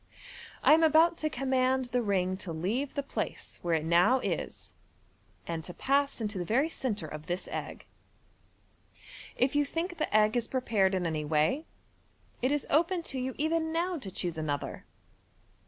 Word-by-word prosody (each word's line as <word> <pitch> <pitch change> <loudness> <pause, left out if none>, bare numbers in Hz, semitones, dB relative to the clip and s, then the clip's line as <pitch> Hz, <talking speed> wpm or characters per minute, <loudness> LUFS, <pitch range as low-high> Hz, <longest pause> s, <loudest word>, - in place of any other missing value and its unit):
I - - +7
am 320 - +5
about 320 +2 +5
to 310 - 0
command 260 -1 +1
the 245 0 0
ring 185 -4 +1
to 185 -3 -6
leave 210 - -2
the 280 - -1
place 275 - -5
where 170 -1 +1
it 155 -1 -1
now 175 +10 +5
is, - - -4 0.7
and 165 -1 -4
to 175 - -8
pass 280 0 +1
into 210 -3 -2
the - - -1
very 260 - +2
centre 220 - -2
of 155 0 -8
this 175 +1 -2
egg. - - -5 1.5
If 255 +3 +1
you 290 - +4
think 330 +4 -4
the 310 - -1
egg 215 +1 +4
is 235 -1 0
prepared 215 -7 +1
in 180 -2 -1
any 160 -2 -1
way, 155 - +1 0.7
it 255 +2 +2
is 295 -1 0
open 340 +4 +2
to 260 - -2
you 255 +1 -3
even 320 +2 0
now 345 +1 -1
to 200 - -6
choose 175 -3 -3
another. 145 -2 -3
250 Hz, 170 wpm, -30 LUFS, 180-290 Hz, 1.5 s, I